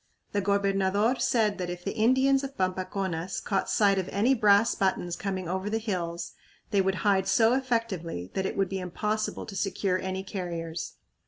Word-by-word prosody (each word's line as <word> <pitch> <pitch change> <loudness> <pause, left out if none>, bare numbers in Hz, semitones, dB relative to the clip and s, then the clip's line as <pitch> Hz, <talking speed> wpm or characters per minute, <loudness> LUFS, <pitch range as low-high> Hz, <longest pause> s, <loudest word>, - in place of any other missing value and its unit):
The 205 - 0
gobernador 200 +3 +1
said 215 -4 +2
that 180 -1 -2
if 175 0 -6
the - - -2
Indians 260 +4 +3
of 275 0 -6
Pampaconas 185 -1 -2
caught 195 -2 -1
sight 200 -2 +3
of 185 - -3
any 225 +7 +3
brass 210 -2 +4
buttons 180 -3 0
coming 185 -1 -3
over 190 +3 -2
the 220 - 0
hills 175 -6 -3 0.4
they 200 -2 +4
would 190 0 +1
hide 195 -2 +3
so 225 +4 +4
effectively 225 - -2
that 190 0 -1
it - - -5
would 195 -1 +2
be 195 - -3
impossible 210 +4 -2
to 200 - -8
secure 195 -1 0
any 190 0 -3
carriers. 170 -4 -5
195 Hz, 175 wpm, -28 LUFS, 185-215 Hz, 0.4 s, brass